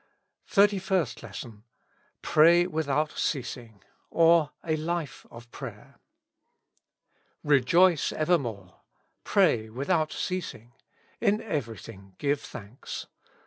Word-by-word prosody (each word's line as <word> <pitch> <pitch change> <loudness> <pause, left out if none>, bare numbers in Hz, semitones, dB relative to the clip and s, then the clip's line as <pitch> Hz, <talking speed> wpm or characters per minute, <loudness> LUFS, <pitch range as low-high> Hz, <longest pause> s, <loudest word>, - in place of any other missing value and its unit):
251 - - -15
THIRTY 205 -1 +2
FIRST 185 - -1
LESSON. 110 -3 -9 0.6
"Pray 170 +3 +5
without 155 -3 -1
ceasing;'* 120 -7 -4 0.3
or, 165 -2 +4
A 160 -1 0
Life 155 -2 -4
of 120 0 -13
Prayer. - - -10 1.4
Rejoice 150 +5 +4
evermore. 120 - -1 0.4
Pray 110 0 +3
luiihout 155 +7 0
ceasing. 155 -10 -4 0.5
In 210 +2 +2
everything 115 - -6
give 145 0 0
thanks. 105 +4 -8
150 Hz, 95 wpm, -27 LUFS, 115-170 Hz, 1.4 s, Pray